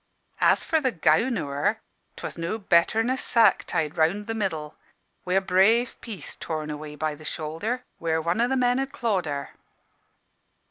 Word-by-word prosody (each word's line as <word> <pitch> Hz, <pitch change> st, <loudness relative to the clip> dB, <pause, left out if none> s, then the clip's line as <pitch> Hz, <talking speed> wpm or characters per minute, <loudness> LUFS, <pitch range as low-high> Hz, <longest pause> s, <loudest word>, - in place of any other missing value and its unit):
As -, -, +4 dB
for 320 Hz, -1 st, +1 dB
the 260 Hz, -3 st, +1 dB
gown 180 Hz, +8 st, +2 dB
o' 165 Hz, -, -2 dB
her, 145 Hz, +10 st, 0 dB, 0.4 s
'twas -, -, -6 dB
no 170 Hz, +6 st, -3 dB
better'n 205 Hz, +3 st, +3 dB
a -, -, +2 dB
sack 225 Hz, -6 st, +3 dB
tied 155 Hz, -2 st, -2 dB
round 170 Hz, +6 st, +2 dB
the 225 Hz, -, -3 dB
middle, 160 Hz, -8 st, -3 dB, 0.5 s
wi' 180 Hz, 0 st, 0 dB
a 195 Hz, -, +4 dB
brave 200 Hz, +6 st, +3 dB
piece 200 Hz, -10 st, -7 dB
torn 155 Hz, -2 st, -4 dB
away 150 Hz, 0 st, -7 dB
by 155 Hz, 0 st, -2 dB
the 150 Hz, +1 st, -12 dB
shoulder, 165 Hz, +12 st, -3 dB, 0.2 s
where 160 Hz, -1 st, 0 dB
one 170 Hz, +7 st, 0 dB
o' 240 Hz, -, +3 dB
the 265 Hz, +1 st, 0 dB
men 250 Hz, 0 st, +2 dB
had 270 Hz, 0 st, -2 dB
clawed 220 Hz, -, -1 dB
her. 140 Hz, -1 st, -4 dB
185 Hz, 180 wpm, -25 LUFS, 155-230 Hz, 0.5 s, As